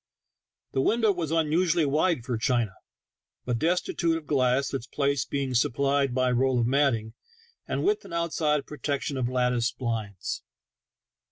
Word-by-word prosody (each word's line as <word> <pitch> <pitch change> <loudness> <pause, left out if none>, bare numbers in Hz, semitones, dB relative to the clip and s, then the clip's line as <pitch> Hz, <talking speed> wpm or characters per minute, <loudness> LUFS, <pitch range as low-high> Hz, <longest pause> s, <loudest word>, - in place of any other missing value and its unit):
The 135 - +1
window 220 - +3
was 175 -5 -3
unusually 165 +1 +2
wide 150 -2 +1
for 125 - -1
China, 115 -2 0 0.7
but 120 -2 -1
destitute 170 0 +1
of 160 - -9
glass, 135 -1 +1
its 125 -4 -3
place 140 -1 0
being 135 -2 -2
supplied 140 +1 +1
by 130 -1 +2
a - - +1
roll 130 +1 +2
of 115 - +2
matting, 120 -4 +1 0.5
and - - -2
with 420 +2 +1
an - - -12
outside 160 -3 0
protection 145 -1 -3
of 125 -2 -1
lattice 125 -1 +1
blinds. 110 -6 -4
140 Hz, 150 wpm, -27 LUFS, 125-155 Hz, 0.7 s, window